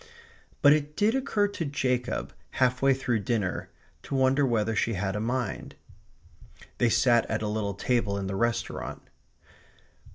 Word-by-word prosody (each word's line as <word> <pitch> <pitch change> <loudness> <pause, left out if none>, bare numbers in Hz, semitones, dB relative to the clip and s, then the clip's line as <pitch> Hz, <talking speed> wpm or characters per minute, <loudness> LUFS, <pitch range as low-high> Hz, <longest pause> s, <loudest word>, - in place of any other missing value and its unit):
But 145 0 +8
it 150 0 -2
did 210 +2 +3
occur 255 -6 +1
to 200 -4 -4
Jacob, 130 -4 -2 0.2
half 130 0 +1
way 135 0 +5
through 125 -4 -1
dinner, 100 -2 -2 0.3
to - - -5
wonder 135 +2 +3
whether 115 -2 0
she 115 +2 +1
had 95 0 -2
a - - -1
mind. 120 -1 -3 1.0
They 120 - +4
sat 120 0 +3
at 110 0 -1
a - - -1
little 105 -2 -2
table 105 -2 0
in 100 - -3
the 95 0 -3
restaurant. 120 +2 -2
120 Hz, 155 wpm, -27 LUFS, 105-135 Hz, 1.0 s, But